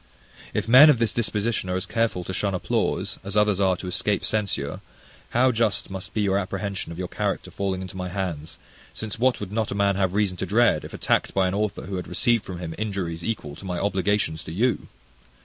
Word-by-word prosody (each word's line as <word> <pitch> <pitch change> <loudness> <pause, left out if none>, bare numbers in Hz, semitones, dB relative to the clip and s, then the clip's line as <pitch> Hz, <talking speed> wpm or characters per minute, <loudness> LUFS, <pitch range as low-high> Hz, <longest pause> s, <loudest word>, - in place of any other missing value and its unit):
If - - -2
men 130 +6 +9
of 145 - +5
this 115 -1 +1
disposition 110 -3 0
are 90 - 0
as 95 0 -1
careful 110 -4 0
to 95 - -5
shun 100 +1 0
applause, 90 - -1
as 100 +1 -3
others 105 -2 +3
are 95 -2 +3
to - - -8
escape 100 +3 0
censure, 100 -10 -1 0.5
how 125 +2 +4
just 110 -4 +1
must 95 -1 -6
be 110 - +1
your 100 -1 +2
apprehension 100 0 -3
of 85 - -7
your 90 0 -3
character - - -2
falling 95 -1 -2
into 95 0 -8
my 90 -1 -4
hands; 85 -5 -4 0.4
since 110 0 -4
what 130 +1 +3
would 100 -2 -6
not 110 0 -1
a - - -3
man 100 -1 +2
have 95 -1 +1
reason 100 -3 +1
to 95 - -3
dread, 115 +5 +3
if - - -8
attacked - - +1
by 95 -1 +3
an 90 - -1
author 105 0 -1
who 95 0 -4
had 90 - -5
received 120 -4 +2
from 95 - -6
him 85 -2 -5
injuries 95 -6 -3
equal 90 -10 -3
to - - -10
my 90 -2 -3
obligations 100 -3 0
to - - -6
you! 115 +9 0
100 Hz, 220 wpm, -25 LUFS, 90-110 Hz, 0.5 s, men